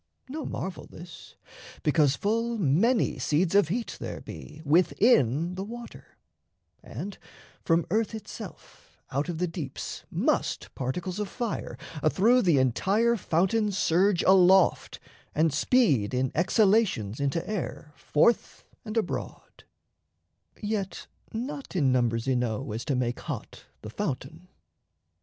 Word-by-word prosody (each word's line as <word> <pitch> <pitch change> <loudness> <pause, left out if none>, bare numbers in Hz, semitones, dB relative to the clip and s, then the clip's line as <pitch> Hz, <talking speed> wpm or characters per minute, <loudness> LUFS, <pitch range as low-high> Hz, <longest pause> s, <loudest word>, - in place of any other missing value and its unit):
No 300 +4 -5
marvel, 185 -3 -5
this: 175 0 -12 0.5
Because 150 -2 +3
full 230 +5 -1
many 205 - +2
seeds 165 +4 +1
of 200 -5 +5
heat 225 +7 -3
there - - -5
be 150 - -10
Within 165 - +3
the 190 +1 -4
water; 235 +3 -10 0.6
and, 200 0 -7 0.4
from 165 0 +2
earth 220 +2 0
itself 220 - -11
Out 140 +6 -1
of 170 - -3
the 180 - 0
deeps 165 -6 -6
must - - -1
particles 175 +9 -3
of 205 -2 -2
fire 240 -4 -4 0.2
Athrough 220 - +4
the 170 - +3
entire 195 - +2
fountain 205 +3 +1
surge 190 0 +2
aloft, 190 0 +4 0.4
And 155 -1 +2
speed 140 - +2
in 130 0 0
exhalations 185 - +2
into 140 +4 -1
air 170 -6 -5
Forth 225 +11 +1 0.2
and 215 0 -5
abroad 225 - -4 1.0
(yet 200 -4 -3 0.3
not 265 +2 -5
in 140 -7 +3
numbers 120 -1 +1
enow 125 -1 -1
As 115 +3 -4
to 140 - 0
make 120 -1 -1
hot - - -7 0.2
the 110 - -7
fountain). 165 - -4
180 Hz, 125 wpm, -27 LUFS, 140-215 Hz, 1.0 s, of